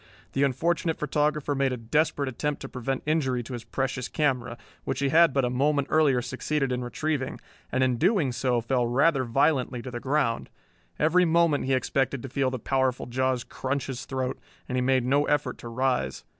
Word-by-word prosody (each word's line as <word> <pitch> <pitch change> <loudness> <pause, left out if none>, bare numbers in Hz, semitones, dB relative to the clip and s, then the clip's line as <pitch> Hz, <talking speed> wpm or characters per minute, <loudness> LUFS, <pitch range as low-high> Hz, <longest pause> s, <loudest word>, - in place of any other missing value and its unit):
The 135 - 0
unfortunate 160 +5 +1
photographer 150 0 0
made 135 -1 +1
a 125 - -2
desperate 140 +4 0
attempt 145 +3 -2
to - - -5
prevent 130 +1 -3
injury 135 -6 0
to 120 - -8
his 120 -2 -5
precious 130 +1 -2
camera, 125 -6 -1 0.3
which - - -2
he 140 -1 +1
had 165 +2 +6
but 135 -1 +1
a - - 0
moment 140 +2 +1
earlier 140 -6 +3
succeeded 135 +2 -2
in 125 0 -1
retrieving, 130 +3 -2 0.3
and 130 +1 +2
in 125 -2 +1
doing 175 - +2
so 125 -1 0
fell 120 +1 0
rather 135 +3 +3
violently 130 0 +1
to 130 - -6
the 120 - -4
ground. 130 -3 0 0.5
Every 165 +4 +4
moment 165 -4 +3
he 135 - +1
expected 135 0 -1
to 135 - -6
feel 135 +1 0
the 130 - -3
powerful 130 +1 0
jaws 130 0 0
crunch 135 +1 -3
his 125 -2 -5
throat, 130 -1 -3 0.3
and 125 - -3
he 125 - +1
made 130 -1 +2
no 140 +3 +3
effort 145 -3 0
to - - -8
rise. 125 +2 -1
135 Hz, 195 wpm, -26 LUFS, 125-145 Hz, 0.5 s, had